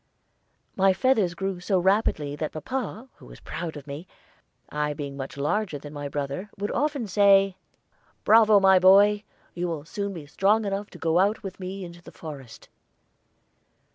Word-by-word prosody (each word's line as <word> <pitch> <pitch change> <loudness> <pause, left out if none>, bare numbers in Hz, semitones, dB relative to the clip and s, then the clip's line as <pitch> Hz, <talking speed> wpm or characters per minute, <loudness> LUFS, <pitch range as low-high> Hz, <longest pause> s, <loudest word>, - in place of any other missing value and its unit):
My 190 0 +4
feathers 210 -7 +1
grew 195 0 -3
so 185 +2 0
rapidly 180 -6 +1
that 155 +1 -4
papa, 235 - -5
who - - -15
was - - -13
very - - -14
proud 165 -2 -4
of 140 - -10
me, 150 +5 -8 0.6
I 150 0 -2
being 140 -1 -6
much 135 0 -7
larger 170 +4 -1
than 145 +1 -10
my 145 -1 -5
brother, 145 +7 -4
would 205 +1 -3
often 285 -2 -1
say, 195 -1 +4 0.7
"Bravo, 215 -2 +6
my 190 -1 +6
boy! 200 +3 +6 0.3
You 175 0 -3
will 160 -3 -4
soon 200 +3 -4
be 160 -4 -8
strong 205 +8 +1
enough 200 +1 -3
to - - -13
go 165 +1 +1
out 205 +4 +1
with 195 -1 -7
me 190 0 -6
into 175 0 -12
the - - -13
forest." 140 -7 -10
185 Hz, 170 wpm, -25 LUFS, 150-205 Hz, 0.7 s, Bravo